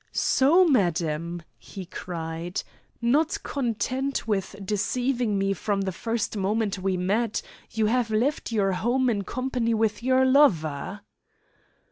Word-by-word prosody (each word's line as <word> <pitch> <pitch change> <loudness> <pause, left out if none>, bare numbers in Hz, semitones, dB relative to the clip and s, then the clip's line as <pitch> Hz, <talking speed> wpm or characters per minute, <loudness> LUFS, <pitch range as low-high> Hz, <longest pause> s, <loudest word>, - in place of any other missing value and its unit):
"So, 325 +8 +4
madam." 170 - 0 0.2
he 195 -2 -9
cried, 170 0 -5 0.4
"not 290 +7 +2
content 260 +1 -2
with 200 -2 -1
deceiving 240 +2 0
me 195 0 +1
from 195 +2 -1
the 190 -1 -1
first 225 +5 -2
moment 205 0 0
we 185 0 0
met, 205 +5 0 0.3
you 220 -1 0
have 235 +1 +1
left 235 +5 0
your 200 -3 +2
home 245 +6 +1
in 205 -3 -1
company 245 0 -1
with 220 -1 0
your 260 +1 +3
lover!" 200 - +2
215 Hz, 125 wpm, -26 LUFS, 190-250 Hz, 0.4 s, So